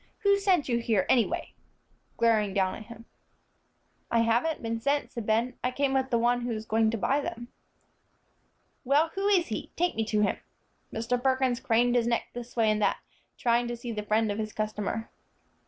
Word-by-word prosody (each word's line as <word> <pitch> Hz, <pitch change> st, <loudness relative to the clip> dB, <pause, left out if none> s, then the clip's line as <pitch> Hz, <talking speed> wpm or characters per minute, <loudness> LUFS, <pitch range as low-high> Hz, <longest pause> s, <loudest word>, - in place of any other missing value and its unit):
"Who 400 Hz, 0 st, +4 dB
sent 375 Hz, -6 st, +2 dB
you 235 Hz, -2 st, +1 dB
here, 220 Hz, -5 st, +1 dB
anyway?" 240 Hz, -3 st, +1 dB, 0.6 s
glaring 215 Hz, -4 st, +2 dB
down 190 Hz, -1 st, +2 dB
at 215 Hz, -, -9 dB
him. 230 Hz, -1 st, -12 dB, 1.0 s
"I 230 Hz, -, +3 dB
haven't 235 Hz, +7 st, +1 dB
been 225 Hz, 0 st, -2 dB
sent," 285 Hz, +4 st, 0 dB
said 235 Hz, -3 st, -6 dB
Ben; 230 Hz, +3 st, +1 dB
"I 250 Hz, -, +2 dB
came 275 Hz, +1 st, 0 dB
with 265 Hz, 0 st, +1 dB
the 235 Hz, -, +2 dB
one 240 Hz, +1 st, +2 dB
who 240 Hz, 0 st, -3 dB
is 215 Hz, 0 st, -5 dB
going 220 Hz, 0 st, +2 dB
to 230 Hz, -, -1 dB
buy 270 Hz, +7 st, +1 dB
them." 240 Hz, -3 st, -6 dB, 1.3 s
"Well, 290 Hz, +5 st, +3 dB
who 390 Hz, +1 st, -1 dB
is 380 Hz, -4 st, +4 dB
he? 215 Hz, -, -4 dB
Take 355 Hz, +1 st, +1 dB
me 225 Hz, -, -1 dB
to 215 Hz, -1 st, +1 dB
him." 205 Hz, -, +1 dB, 0.5 s
Mr. 240 Hz, +2 st, -1 dB
Perkins 260 Hz, -1 st, +1 dB
craned 240 Hz, +1 st, +2 dB
his 235 Hz, -1 st, +2 dB
neck 235 Hz, -1 st, 0 dB
this 240 Hz, 0 st, -8 dB
way 225 Hz, -2 st, +3 dB
and 215 Hz, 0 st, 0 dB
that, -, -, +2 dB, 0.4 s
trying 240 Hz, 0 st, +2 dB
to 240 Hz, 0 st, -4 dB
see 235 Hz, 0 st, -6 dB
the 210 Hz, -2 st, -3 dB
friend 215 Hz, +1 st, +1 dB
of 205 Hz, -, -4 dB
his 215 Hz, -1 st, -4 dB
customer. 215 Hz, +1 st, -3 dB
235 Hz, 195 wpm, -28 LUFS, 220-260 Hz, 1.3 s, Who